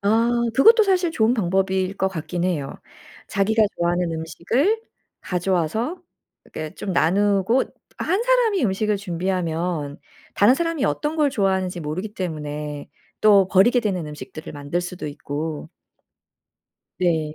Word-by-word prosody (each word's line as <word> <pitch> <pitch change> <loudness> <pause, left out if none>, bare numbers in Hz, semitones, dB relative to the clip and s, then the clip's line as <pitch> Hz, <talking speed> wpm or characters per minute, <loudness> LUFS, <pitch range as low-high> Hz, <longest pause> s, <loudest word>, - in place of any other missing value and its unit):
아 225 +4 +2 0.2
그것도 450 - +7
사실 370 -4 +2
좋은 225 -1 +2
방법일 190 -1 0
것 190 - +1
같기는 175 +1 -3
해요. 145 -6 -3 0.5
자기가 215 +3 +2
좋아하는 175 0 0
음식을 230 - 0 0.4
가져와서 185 - -1 0.4
이렇게 155 0 -7
좀 195 - -4
나누고 200 +7 +2 0.3
1 395 +5 0
사람이 475 - +2
음식을 210 +1 0
준비하면 175 -5 -2 0.4
다른 210 +5 +5
사람이 330 -2 -1
어떤 300 +1 -1
걸 300 -3 +2
좋아하는지 190 -6 0
모르기 180 +8 -5
때문에 150 -5 -5 0.3
또 200 -3 +6
버리게 200 +7 +4
되는 190 -7 -2
음식들을 150 +1 -9
만들 145 +4 -3
수도 180 -1 -6
있고 150 +1 -5 1.3
네. 160 -4 0
190 Hz, 290 characters per minute, -22 LUFS, 165-225 Hz, 1.3 s, 그것도